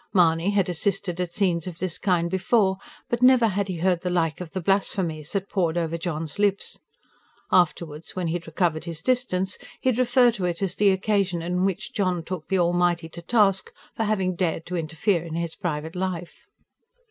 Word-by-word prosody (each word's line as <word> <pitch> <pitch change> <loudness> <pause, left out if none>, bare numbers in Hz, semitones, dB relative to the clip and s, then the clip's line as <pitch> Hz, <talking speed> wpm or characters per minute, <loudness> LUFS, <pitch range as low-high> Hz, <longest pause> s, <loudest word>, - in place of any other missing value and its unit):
Mahony 170 0 +4
had 200 -3 +2
assisted 180 0 -1
at 175 -2 -3
scenes 175 -3 0
of 175 -3 -6
this 185 -2 -2
kind 180 -4 +1
before, 190 +1 +2 0.3
but 240 0 -2
never 250 -2 +6
had 200 0 -1
he 185 -3 -3
heard 175 0 +1
the 180 - -2
like 165 -2 0
of 175 - -6
the 185 - -4
blasphemies 175 -4 0
that 200 -1 -1
poured 175 -5 0
over 165 -1 -1
John's 165 -1 -4
lips. 200 -1 0 0.7
(Afterwards, 165 -3 +1
when 185 -1 -2
he 165 - -1
had 175 -1 -4
recovered 160 -1 0
his 165 -1 -6
distance, 205 -7 0 0.2
he 260 - +1
would 250 -1 0
refer 245 0 +5
to 200 -5 -3
it 175 +2 -2
as 185 -2 -1
the 205 +1 +3
occasion 190 -3 +1
on 180 +2 0
which 195 +2 -2
John 185 -4 0
took 175 -2 -6
the 190 - +1
Almighty 175 -1 +1
to 170 - -9
task, 195 0 +2 0.2
for 225 - 0
having 190 -4 0
dared 170 -2 -1
to 180 - -4
interfere 165 +2 0
in 165 -2 -6
his 170 -1 -2
private 160 -1 -4
life.) 180 -2 -4
180 Hz, 195 wpm, -25 LUFS, 170-195 Hz, 0.7 s, never